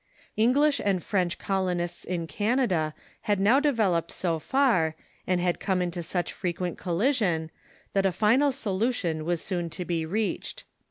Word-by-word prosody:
English 280 +6 +3
and 195 -3 +1
French 180 -5 0
colonists 180 -3 -2
in 175 -2 -3
Canada 205 - 0 0.3
had 205 -2 +3
now 220 +8 +5
developed 215 - +1
so 170 -3 -1
far, 225 - +2 0.3
and 180 -1 +2
had 175 0 0
come 190 -2 0
into 175 -1 -2
such 175 +1 -2
frequent 180 -1 -3
collision, 180 - 0 0.4
that 195 -1 +3
a - - +1
final 235 +9 +3
solution 200 - -1
was 170 -1 0
soon 175 -3 -2
to 180 +2 -5
be 170 -2 -1
reached. 205 +7 -2
185 Hz, 150 wpm, -27 LUFS, 170-220 Hz, 0.4 s, now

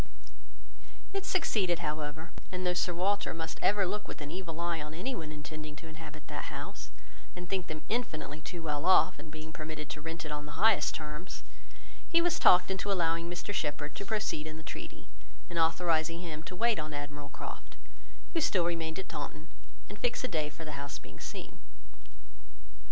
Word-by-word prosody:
It 390 0 -1
succeeded, 205 - +3
however; 155 +1 -2 0.2
and 185 0 -2
though 180 - +4
Sir 180 0 +2
Walter 190 +2 +2
must 160 0 -3
ever 200 -1 +5
look 205 +3 -2
with - - -6
an 145 -1 -5
evil 170 -2 -4
eye 170 -2 +1
on 150 +1 -5
anyone 170 -5 -2
intending 155 0 -6
to 155 - -10
inhabit 155 -1 -8
that - - -4
house, - - -5 0.5
and 175 0 -5
think 185 -1 0
them 155 -1 -4
infinitely 155 -10 -1
too 170 +1 -5
well 150 0 0
off 185 -4 +7
in 155 - -8
being 155 +1 -7
permitted 155 -2 -4
to 150 - -4
rent 165 +1 -4
it 150 - -3
on 150 0 -3
the 150 - -7
highest 215 +2 +5
terms, 150 +3 -5 0.7
he 335 - +7
was 345 0 +3
talked 180 +1 +8
into 190 +1 0
allowing 170 -2 +2
Mr 175 +3 -3
Shepherd 150 -3 0
to 200 - -4
proceed 200 -7 0
in 155 0 -5
the 160 - -8
treaty, - - -6 0.5
and 170 - 0
authorising 165 0 +3
him 160 -3 -4
to 185 - -5
wait 230 +1 +4
on 155 -1 -3
Admiral 145 0 -5
Croft, - - -7 0.6
who 330 - +3
still 185 - +4
remained 165 -2 0
at 190 - -3
Taunton, 150 +2 -5 0.4
and 205 - -8
fix 245 +1 +1
a - - +2
day 155 -7 +1
for 150 +2 -8
the 145 -2 -4
house 140 0 -4
being 80 -1 -12
seen. - - -6
165 Hz, 190 wpm, -33 LUFS, 150-185 Hz, 0.7 s, talked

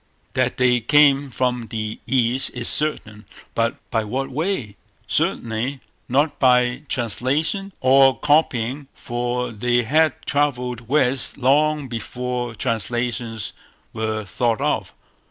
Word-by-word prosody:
That - - 0
they 125 -1 +3
came 140 +2 +4
from 125 -2 -1
the 110 -1 -4
East 125 +1 +1
is 120 -1 -2
certain; 110 -8 -2 0.3
but 115 0 0 0.2
by 115 -3 +1
what 135 +5 -3
way, 145 - -2 0.3
certainly 120 +5 -1 0.3
not 145 +5 +1
by 125 0 +3
translations 150 - -1
or 135 +1 +5
copying, 140 -3 +1
for 120 0 -3
they 120 +2 +1
had 155 +5 +2
travelled 125 -5 -1
west 135 -2 +1
long 145 +2 +2
before 120 +1 -4
translations 115 -1 -2 0.4
were 110 -1 -2
thought 115 +2 0
of. - - -1
125 Hz, 115 wpm, -22 LUFS, 115-140 Hz, 0.4 s, or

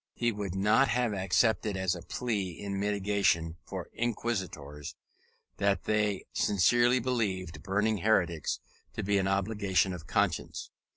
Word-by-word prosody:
He 120 0 +1
would 100 -4 -4
not 105 +7 +4
have 120 -1 +1
accepted 100 +2 +1
as 95 -2 +1
a 90 - -6
plea 100 -8 -3
in 100 -1 -3
mitigation 100 -5 +1
for - - -6
inquisitors, 95 -11 -3 0.6
that 100 -2 +1
they 105 -2 0
sincerely 120 +5 +3
believed 105 -8 -2
burning 105 +2 +1
heretics 85 -5 +1 0.3
to - - -4
be 100 0 +2
an 95 - 0
obligation 100 -1 +1
of 85 -3 -8
conscience. - - -1
100 Hz, 130 wpm, -30 LUFS, 95-110 Hz, 0.6 s, not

